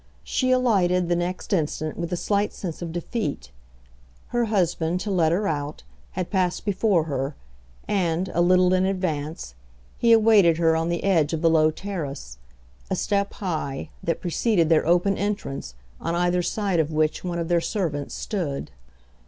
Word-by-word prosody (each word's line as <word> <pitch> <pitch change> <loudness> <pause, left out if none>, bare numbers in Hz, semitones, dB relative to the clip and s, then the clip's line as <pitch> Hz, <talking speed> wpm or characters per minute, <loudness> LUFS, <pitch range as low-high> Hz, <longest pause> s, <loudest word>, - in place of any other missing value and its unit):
She 255 - 0
alighted 190 -9 +2
the 175 - +3
next 175 +3 -3
instant 155 -2 -1
with 170 0 -4
a 180 - -1
slight 205 +3 0
sense 175 -4 -6
of 170 -1 -4
defeat; 170 - -4 0.8
her 240 -1 +1
husband, 180 -4 0
to 205 - -3
let 165 -4 +3
her 200 +4 +1
out, 145 -1 -3 0.3
had 180 - -4
passed 180 -2 0
before 200 -3 +2
her, 140 -2 -3 0.5
and, 180 -2 0
a 170 - +2
little 180 +1 +4
in 185 0 +3
advance, 160 - -3 0.5
he 235 - +4
awaited 215 -7 +6
her 165 -1 +3
on 165 +1 0
the 170 0 -2
edge 165 -6 +2
of 160 +1 -2
the 165 - +5
low 155 -1 +5
terrace, 150 - -6 0.5
a - - 0
step 200 -1 0
high, 155 -6 -4
that 165 - -2
preceded 175 -1 +1
their 160 -1 +3
open 180 +3 +2
entrance, 200 - -3 0.2
on 170 - -2
either 175 +1 +2
side 195 -1 0
of 160 0 +1
which 155 0 0
one 175 -1 -3
of 170 -1 -2
their 170 0 +2
servants 165 -8 -2
stood. 155 - -3
175 Hz, 170 wpm, -24 LUFS, 160-195 Hz, 0.8 s, awaited